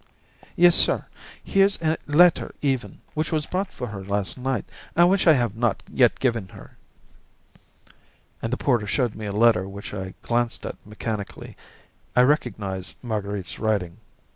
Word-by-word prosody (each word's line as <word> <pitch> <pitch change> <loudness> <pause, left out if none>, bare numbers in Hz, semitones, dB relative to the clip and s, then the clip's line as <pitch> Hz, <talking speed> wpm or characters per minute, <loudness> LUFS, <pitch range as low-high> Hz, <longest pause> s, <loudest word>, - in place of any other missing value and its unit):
"Yes, 175 0 +6
sir; - - +4 0.4
here's 195 +1 +3
a 160 0 +2
letter 165 +4 +4
even, 135 -3 -2
which 155 0 -2
was 155 -2 0
brought 190 +1 -3
for - - -6
her 100 -2 -7
last 100 0 0
night 130 -3 -2 0.3
and 175 +2 +5
which 195 -2 +2
I 160 - +9
have 120 -7 0
not 115 -1 0
yet - - +3
given 115 -7 0
her." - - -14 1.7
And 115 - -3
the 125 - 0
porter 120 -7 +1
showed 120 +1 0
me 110 -1 -6
a - - -3
letter 105 -3 +3
which 100 +1 -8
I 95 -2 -6
glanced 120 0 0
at - - -7
mechanically. 105 -1 -6 0.6
I 125 - +6
recognised 100 - -1
Marguerite's 100 -5 -4
writing. 100 -6 -1
115 Hz, 155 wpm, -24 LUFS, 100-145 Hz, 1.7 s, I